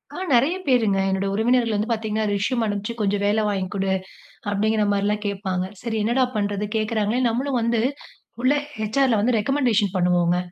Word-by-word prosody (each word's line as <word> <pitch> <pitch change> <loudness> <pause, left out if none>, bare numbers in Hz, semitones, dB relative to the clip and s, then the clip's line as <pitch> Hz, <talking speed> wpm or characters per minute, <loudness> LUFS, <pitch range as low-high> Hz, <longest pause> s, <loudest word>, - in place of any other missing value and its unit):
அ, - - -7 0.2
நிறைய 275 +10 +3
பேருங்க. 225 -7 +3
என்னோட 190 +1 0
உறவினர்கள் 230 +1 +2
வந்து 210 +3 -1
பாத்தீங்கன்னா 220 -1 -1
ரெஸ்யூம் 225 +4 0
அனுப்ச்சு 205 +1 -3
"கொஞ்சம் 200 0 0
வேல 210 +2 +2
வாங்கி 195 -2 -1
குடு" 195 -1 -1 0.6
அப்படிங்கிற 215 +1 +1
மாரிலாம் 205 +1 0
கேட்பாங்க. 190 -2 -2 0.2
சரி 225 -2 -2
என்னடா 245 +4 +2
பண்றது 205 0 -1
கேக்குறாங்களேன் 220 +3 0
நம்மளும் 255 +2 -1
வந்து 235 0 +1 0.6
உள்ள, 255 +2 +4 0.4
HR 275 +2 +3
ல 220 - +3
வந்து 235 +1 +2
ரெக்கமண்டேஷன் 220 -5 +1
பண்ணுவோங்க. 175 -1 +2
215 Hz, 160 wpm, -23 LUFS, 200-235 Hz, 0.6 s, உள்ள